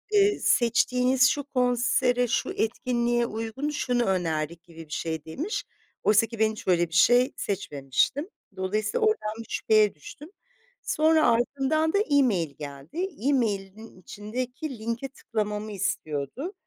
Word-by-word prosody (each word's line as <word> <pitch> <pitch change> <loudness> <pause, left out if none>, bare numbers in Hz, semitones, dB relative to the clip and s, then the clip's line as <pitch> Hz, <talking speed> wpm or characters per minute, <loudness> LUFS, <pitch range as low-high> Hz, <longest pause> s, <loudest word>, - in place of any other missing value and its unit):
ııı, 405 0 +4
seçtiğiniz 250 +2 +3
şu 290 - -1
konsere, 245 -1 +1
şu - - -1
etkinliğe 240 +1 0
uygun, 225 +6 -4
şunu 250 -5 0
önerdik 165 -3 -1
gibi 165 -2 -12
bir 150 - -8
şey 160 -2 -3
demiş. 305 - -4 0.4
Oysa 210 +1 +5
ki 230 0 -9
ben 220 0 +3
hiç 215 - -10
öyle 175 -2 +3
bir 165 - -13
şey 245 +8 +5
seçmemiştim. 190 - -1 0.3
Dolayısıyla 205 +3 -1
oradan 215 - 0
bir 230 - -7
şüpheye 215 -4 +3
düştüm. 295 - -12 0.5
Sonra 315 0 +3
ardından 280 +7 +1
da - - +3
email 255 - +2
geldi. 145 - -5 0.2
Emailin 215 -5 -2
içindeki 250 - -5
linke 230 +4 -3
tıklamamı 215 -4 -4
istiyordu. 190 - -3
230 Hz, 130 wpm, -26 LUFS, 190-260 Hz, 0.5 s, Oysa